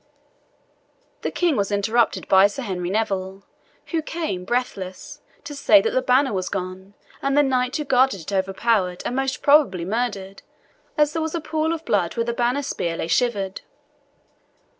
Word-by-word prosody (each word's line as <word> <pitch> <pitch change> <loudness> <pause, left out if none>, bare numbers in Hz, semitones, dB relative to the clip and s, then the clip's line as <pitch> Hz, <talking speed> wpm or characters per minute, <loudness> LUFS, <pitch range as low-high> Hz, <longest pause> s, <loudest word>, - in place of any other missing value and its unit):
The - - -2
King 345 -4 +1
was 200 -2 -1
interrupted 220 +4 +1
by 190 +1 +6
Sir 255 +7 -6
Henry 180 -5 -3
Neville, 195 -2 -2 0.5
who 330 -2 0
came, 310 - -4
breathless, 245 +4 -4 0.2
to 290 - -7
say 295 +2 +5
that 455 - 0
the - - +1
banner 265 - +2
was 185 -1 -2
gone, 190 +1 -6 0.3
and 275 +1 0
the 290 - +6
knight 255 -2 0
who 300 - -2
guarded 260 - +2
it 165 - -7
overpowered, 190 -1 0
and 245 - -2
most 270 0 -2
probably 280 - +4
murdered, 200 -2 -3 0.6
as 300 0 +3
there 325 - -1
was 320 +1 -3
a - - -1
pool 315 0 -1
of 325 -1 -4
blood 185 -3 0
where 230 - +1
the 235 - -1
banner 245 +4 0
spear 170 -10 -3
lay - - -3
shivered. 200 -3 0
235 Hz, 170 wpm, -22 LUFS, 190-285 Hz, 0.6 s, by